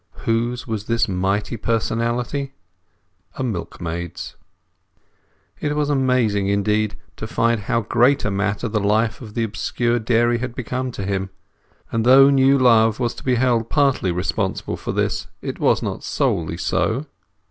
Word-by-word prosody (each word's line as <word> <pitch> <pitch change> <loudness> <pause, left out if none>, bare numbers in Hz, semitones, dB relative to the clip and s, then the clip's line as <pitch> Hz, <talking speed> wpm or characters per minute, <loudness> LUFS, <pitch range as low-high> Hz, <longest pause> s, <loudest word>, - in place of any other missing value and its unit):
Whose 120 +2 0
was 110 -3 -4
this 115 +1 +1
mighty 100 +4 -1
personality? 120 +5 -1 0.8
A 130 - -3
milkmaid's. 85 -5 -5 1.2
It 150 0 -1
was 150 -1 0
amazing, 125 -7 +2
indeed, 105 +1 +1 0.2
to - - -5
find 115 -2 +1
how 115 +3 0
great 120 +6 +2
a 105 - 0
matter 100 +4 -1
the 105 -1 -1
life 110 +4 +1
of 110 -4 -10
the 115 - 0
obscure 120 +2 -1
dairy 120 +1 +2
had 125 0 -5
become 125 +1 -3
to 100 - -5
him. 95 0 -2 0.6
And 115 -1 0
though 135 +3 +7
new 135 0 +4
love 115 -3 +4
was 120 -2 0
to - - -11
be 130 -1 +2
held 120 -2 +1
partly 135 - +2
responsible 95 +2 -2
for - - -5
this, - - -1
it - - -6
was - - +2
not - - -4
solely - - -1
so. 130 +7 0
115 Hz, 150 wpm, -21 LUFS, 105-125 Hz, 1.2 s, though